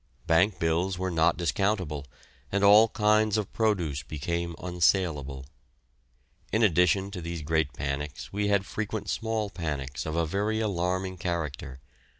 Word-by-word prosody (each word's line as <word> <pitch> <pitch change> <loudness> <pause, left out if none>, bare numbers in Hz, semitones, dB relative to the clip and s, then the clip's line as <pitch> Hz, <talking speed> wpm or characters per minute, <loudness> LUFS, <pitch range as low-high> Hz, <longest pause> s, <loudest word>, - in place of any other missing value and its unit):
Bank 85 +4 +3
bills 85 +3 0
were 95 0 -2
not 80 -1 +3
discountable, 85 - -1 0.4
and 100 +1 0
all 105 +3 +8
kinds 110 -1 +2
of 105 -3 -3
produce 90 -11 0
became 85 +4 -3
unsaleable. 85 -7 0 1.1
In 110 +1 +2
addition 95 +1 +3
to 95 -3 -6
these 85 -1 -5
great 80 -1 +1
panics 70 +4 -4
we 105 +1 0
had 100 -1 +2
frequent 105 -1 -4
small 110 -2 -2
panics 75 -4 -4
of 80 - -3
a 85 0 +1
very 105 +6 -1
alarming 95 -2 -1
character. 75 -6 -4
90 Hz, 140 wpm, -28 LUFS, 80-100 Hz, 1.1 s, all